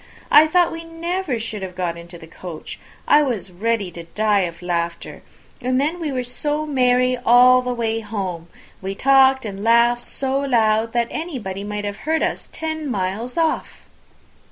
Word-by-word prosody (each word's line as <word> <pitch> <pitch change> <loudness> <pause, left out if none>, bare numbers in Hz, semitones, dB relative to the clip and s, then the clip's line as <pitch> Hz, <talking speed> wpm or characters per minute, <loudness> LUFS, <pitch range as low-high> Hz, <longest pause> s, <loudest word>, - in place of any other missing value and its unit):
I 310 +1 +8
thought 350 +2 +3
we 330 0 -6
never 330 -3 -3
should 220 -2 -5
have 185 -1 -6
got 175 -2 -2
into 170 +1 -11
the 165 - -12
coach. 165 0 -9 0.3
I 300 - +6
was 225 -10 -2
ready 205 0 -1
to 170 0 -9
die 210 +3 +1
of 170 +1 -14
laughter. 170 -1 -3 0.4
And 255 +1 +1
then 310 +6 -1
we 315 -4 -3
were 255 -2 -2
so 295 +5 -2
merry 250 -3 +2
all 250 +1 +6
the 250 0 -3
way 225 -2 -1
home! 195 -6 -5 0.3
we 195 +1 -4
talked 265 +1 +4
and 200 -1 -6
laughed 235 +1 +4
so 270 +2 -1
loud, 225 -4 +1
that 235 -1 +1
anybody 235 - -5
might 210 0 -4
have 205 0 -4
heard 320 +7 -1
us - - -3
ten 315 -2 -4
miles 210 - -3
off!" 325 -1 -1
235 Hz, 175 wpm, -21 LUFS, 195-275 Hz, 0.4 s, I